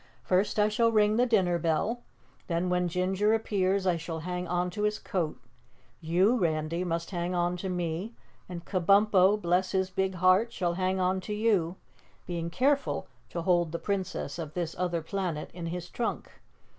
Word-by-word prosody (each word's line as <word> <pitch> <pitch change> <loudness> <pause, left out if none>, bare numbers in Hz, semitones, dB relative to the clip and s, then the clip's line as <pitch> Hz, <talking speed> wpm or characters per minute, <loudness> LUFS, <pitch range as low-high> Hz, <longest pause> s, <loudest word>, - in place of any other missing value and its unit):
First 185 - +1
I 210 0 +4
shall 230 +2 +2
ring 215 0 +3
the 245 +1 +3
dinner 185 -7 +2
bell, 170 +9 0 0.5
then 170 +1 0
when 180 0 +1
Ginger 190 +5 +1
appears, 195 -3 0
I 180 -2 +2
shall 165 0 -5
hang 180 +1 -4
on 180 0 0
to 210 - -5
his 210 0 +1
coat; 170 -6 -3 0.6
you, 180 +8 +3
Randy, 165 0 0
must 170 0 -3
hang 175 0 -2
on 175 0 +1
to 190 +2 -4
me 180 +5 -3 0.3
and 175 -1 -7
Kabumpo, 195 +1 +4
bless 180 0 +1
his 190 0 0
big 190 0 -1
heart, 185 +6 +4
shall 175 -6 -1
hang 185 +1 0
on 185 +1 +1
to 210 +2 -4
you, 200 -6 +1 0.5
being 170 -1 -3
careful 275 +9 +1 0.2
to 170 - -4
hold 175 -2 +2
the 170 - -2
Princess 190 -5 -3
of 155 -2 -6
this 170 -2 -3
Other 175 -2 -1
Planet 175 -3 -3
in 170 -1 -5
his 175 +1 -5
trunk. 235 +5 -3
180 Hz, 175 wpm, -29 LUFS, 170-200 Hz, 0.6 s, I